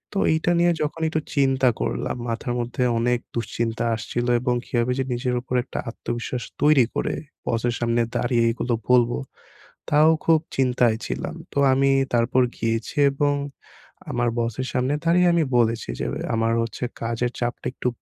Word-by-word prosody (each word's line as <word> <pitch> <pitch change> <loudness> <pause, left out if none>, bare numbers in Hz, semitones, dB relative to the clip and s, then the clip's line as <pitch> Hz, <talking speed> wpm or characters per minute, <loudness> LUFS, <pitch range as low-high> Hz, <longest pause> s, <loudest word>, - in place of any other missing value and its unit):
তো - - +1
এইটা 160 +2 +1
নিয়ে 175 0 +4
যখন 150 +2 -2
একটু 155 - -1
চিন্তা 135 -2 +3
করলাম, - - -2
মাথার 115 +1 -2
মধ্যে 120 +1 -2 0.2
অনেক 120 +1 +1 0.2
দুশ্চিন্তা 115 0 -2
আসছিল 120 +2 -3
এবং 125 -1 +1
কিভাবে 120 0 0
যে 135 - +2
নিজের 125 +1 -1
উপর 125 +1 -4
একটা - - -6
আত্মবিশ্বাস 120 +1 -4 0.2
তৈরি 145 -4 +5
করে - - -1 0.3
বসের 120 +1 0
সামনে 120 0 +1
দাঁড়িয়ে 120 -1 +2
এগুলো 120 +1 -2 0.2
বলবো। 120 -1 +4 0.7
তাও 150 +2 +5 0.2
খুব 165 -1 +5 0.2
চিন্তায় 125 -3 +2
ছিলাম। - - -4 0.2
তো - - -5 0.2
আমি 135 +1 +3 0.2
তারপর 120 +2 +3 0.2
গিয়েছি 115 +3 -2 0.2
এবং 145 +1 +1 0.8
আমার 120 0 +1
বসের 120 +2 -2
সামনে 130 +2 +1
দাঁড়িয়ে 175 +2 +4
আমি 170 -1 +3
বলেছি 115 - +1
যে - - -2
এ - - -5
"আমার 115 0 +1
হচ্ছে 115 +2 -4 0.2
কাজের 115 +1 -1
চাপটা 120 0 -3
একটু 125 - -3
120 Hz, 160 wpm, -23 LUFS, 115-135 Hz, 0.8 s, তৈরি